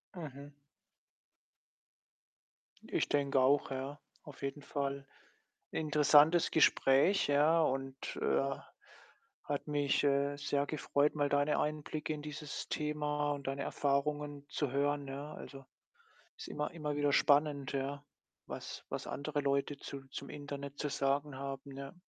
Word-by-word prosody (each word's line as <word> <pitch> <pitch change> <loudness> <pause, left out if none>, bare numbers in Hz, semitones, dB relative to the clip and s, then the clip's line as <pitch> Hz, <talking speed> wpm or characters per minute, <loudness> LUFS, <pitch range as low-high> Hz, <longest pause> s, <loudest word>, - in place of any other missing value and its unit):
Mhm. 145 -4 -8 2.4
Ich - - 0
denke 140 -1 +2
auch, 135 +1 +3
ja, 135 +2 -4 0.2
auf 145 -3 -12
jeden 140 +1 -3
Fall. 140 -1 -3 0.7
Interessantes 150 +2 +5
Gespräch, 160 +4 +4
ja, 150 +3 +4
und, 135 -2 -2
ja, 135 0 0 0.8
hat 145 +1 -3
mich, 145 -1 +1
äh, 140 0 +2
sehr 140 0 0
gefreut, 145 -1 +1
mal 145 -1 +1
deine 145 +1 +2
Einblicke 155 +1 -2
in 150 - -6
dieses 150 -1 -6
Thema 150 -1 -1
und 140 -1 -7
deine 135 +1 -2
Erfahrungen 145 0 -1
zu 145 -4 -1
hören, 145 +1 0
ja. 140 +3 -6
Also, 135 -1 -10 0.7
ist - - -8
immer 150 0 -3
immer 150 -4 -3
wieder 145 0 +2
spannend, 145 -2 +3
ja, 140 +1 -2 0.4
was - - -7
was - - -4
andere 145 +1 -2
Leute 140 +1 0
zu 135 -1 -8
zum - - -7
Internet 140 -1 -7
zu 150 - -1
sagen 140 0 0
haben, 135 0 -6
ja. 135 0 -7
145 Hz, 130 wpm, -34 LUFS, 140-150 Hz, 2.4 s, Interessantes